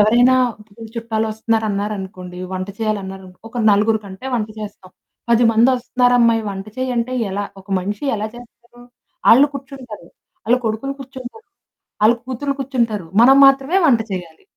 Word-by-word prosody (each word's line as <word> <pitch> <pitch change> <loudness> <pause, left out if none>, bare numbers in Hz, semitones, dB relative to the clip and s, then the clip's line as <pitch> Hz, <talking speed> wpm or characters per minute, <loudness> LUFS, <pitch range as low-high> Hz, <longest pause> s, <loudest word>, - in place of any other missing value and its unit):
ఎవరైనా 240 +5 +5 0.6
చుట్టాలు 225 -1 -2
వస్తున్నారు 220 +1 -1
అన్నారనుకోండి 190 -3 -5
వంట 185 +1 -4
చేయాలి 215 -2 0
అన్నారు 190 0 -8
అనుకో, 180 0 -17
ఒక 240 - -6
నలుగురు 210 +2 +3
కంటే 195 +5 -9
వంట 220 -3 -1
చేస్తాం. 200 -3 -9 0.4
"10 235 +1 +4
మందొస్తున్నారమ్మాయి 245 0 +3
వంట 195 0 -6
చెయ్యి" 255 0 -2
అంటే 235 +2 -1 0.2
ఎలా? 200 +2 -2 0.2
ఒక 190 - -22
మనిషి 205 +6 -4
ఎలా 210 +1 -3
చేస్తారు? 240 0 -15 0.5
ఆళ్ళు 265 +5 +7
కూర్చుంటారు, 260 -9 -9 0.4
ఆళ్ళ 240 +2 +4
కొడుకులు 225 +6 -2
కూర్చుంటారు, 265 - -10 0.6
ఆళ్ళ 220 +2 +6
కూతుర్లు 275 +2 -3
కూర్చుంటారు 235 -8 -1
మనం 265 +3 +7
మాత్రమే 275 +6 +4
వంట 235 -5 +4
చెయ్యాలి. 175 -4 -7
225 Hz, 145 wpm, -19 LUFS, 205-250 Hz, 0.6 s, ఆళ్ళు